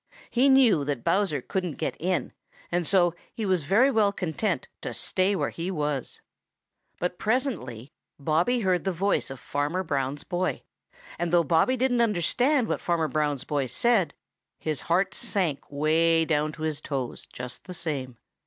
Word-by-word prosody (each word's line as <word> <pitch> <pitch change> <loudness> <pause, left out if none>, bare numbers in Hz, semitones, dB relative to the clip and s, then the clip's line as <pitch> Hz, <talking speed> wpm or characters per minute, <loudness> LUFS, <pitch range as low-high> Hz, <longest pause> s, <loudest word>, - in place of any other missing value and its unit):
He 255 +3 +4
knew 250 - +5
that 140 -5 -2
Bowser 170 -6 +1
couldn't 180 -5 -3
get - - -2
in, 180 +2 -1 0.4
and 175 -2 0
so 175 -3 +4 0.2
he 220 - -2
was 185 -6 +1
very 235 - +4
well 215 -4 +3
content 180 - -2
to - - -5
stay 190 +2 +1
where - - -1
he 170 +2 -4
was. 150 -7 -2 0.8
But 180 0 -2
presently 185 - -2 0.2
Bobby 165 - +1
heard 185 -3 +1
the 195 - 0
voice 195 +3 0
of 135 -1 -7
Fanner 145 +9 -1
Brown's 140 -3 -2
boy, 185 0 -2 0.6
and 170 -1 -1
though 175 -1 +5
Bobby 165 - +3
didn't 245 -1 +2
understand 235 - +2
what - - -2
Farmer 165 -3 0
Brown's 145 -3 0
boy 145 -3 -1
said, 225 - +2 0.4
his 155 -3 -2
heart 185 +4 +2
sank 185 -12 -2
way 160 +3 +3
down 155 -1 +1
to 155 - -8
his 155 -1 -1
toes 135 -5 -4
just 125 0 -8
the 185 - -7
same. 135 -7 -4
170 Hz, 160 wpm, -27 LUFS, 150-200 Hz, 0.8 s, knew